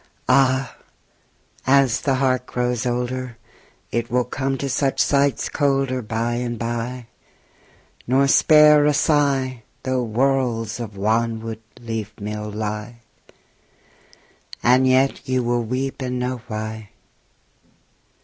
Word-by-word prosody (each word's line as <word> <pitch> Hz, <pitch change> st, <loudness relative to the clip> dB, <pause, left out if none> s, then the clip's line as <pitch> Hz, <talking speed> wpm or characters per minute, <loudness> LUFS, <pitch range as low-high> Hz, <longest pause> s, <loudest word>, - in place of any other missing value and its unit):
Ah! 130 Hz, -1 st, +2 dB, 0.9 s
as 135 Hz, -3 st, +4 dB
the 135 Hz, -2 st, +1 dB
heart 130 Hz, -1 st, 0 dB
grows 125 Hz, 0 st, -1 dB
older 125 Hz, 0 st, -3 dB, 0.5 s
It 120 Hz, 0 st, -2 dB
will 125 Hz, 0 st, +2 dB
come 135 Hz, +2 st, -2 dB
to 140 Hz, -, -3 dB
such 135 Hz, 0 st, 0 dB
sights 140 Hz, -3 st, +2 dB
colder 135 Hz, -3 st, 0 dB
By 115 Hz, +2 st, -2 dB
and 120 Hz, -1 st, -3 dB
by, 120 Hz, +2 st, -4 dB, 1.0 s
nor 135 Hz, +3 st, +3 dB
spare 150 Hz, +1 st, +6 dB
a 150 Hz, -, +2 dB
sigh 135 Hz, -5 st, +1 dB, 0.2 s
Though 130 Hz, -1 st, 0 dB
worlds 120 Hz, -2 st, 0 dB
of 110 Hz, -4 st, -7 dB
wanwood 110 Hz, +1 st, -1 dB, 0.2 s
leafmeal 105 Hz, -2 st, -5 dB
lie. 105 Hz, +2 st, -5 dB, 1.6 s
And 130 Hz, +2 st, +4 dB
yet 130 Hz, +1 st, +2 dB
you 130 Hz, -1 st, +1 dB
will 120 Hz, 0 st, 0 dB
weep 130 Hz, +4 st, -3 dB
and 125 Hz, -1 st, -2 dB
know 125 Hz, -1 st, -3 dB
why. 110 Hz, -1 st, -5 dB
125 Hz, 110 wpm, -22 LUFS, 115-135 Hz, 1.6 s, spare